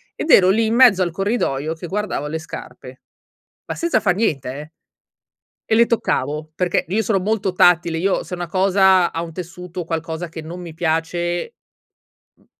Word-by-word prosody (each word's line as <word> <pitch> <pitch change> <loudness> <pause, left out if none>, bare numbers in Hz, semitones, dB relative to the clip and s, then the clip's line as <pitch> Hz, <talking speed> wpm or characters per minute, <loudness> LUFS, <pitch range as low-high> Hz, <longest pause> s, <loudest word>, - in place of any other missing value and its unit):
Ed 310 - -2
ero 185 - +7
lì, 225 +3 +2
in 225 - 0
mezzo 235 -7 +6
al 175 -2 0
corridoio, 160 - -1
che 165 +2 -8
guardavo 200 -5 -3
le 160 +2 -4
scarpe, 160 - -10 0.6
ma - - -5
senza 340 -1 +1
far 185 -3 +1
niente, 155 - -1
eh, 150 +2 -9 0.9
e - - -1
le 230 +1 +5
toccavo, 150 - -1
perché, 175 +1 0
io 210 +5 +1
sono 220 -2 +1
molto 200 0 -1
tattile. 175 -2 +3
Io, 190 +3 0
se 180 - -6
una 175 -1 -5
cosa 190 0 +3
ha 165 - -3
un 165 -1 -8
tessuto, 180 +1 -8
o 175 - -4
qualcosa 165 +1 -4
che 160 0 -8
non 170 +3 -8
mi 170 -2 -8
piace, 175 - -2 0.8
mhmm, - - -30
175 Hz, 180 wpm, -20 LUFS, 165-195 Hz, 0.9 s, ero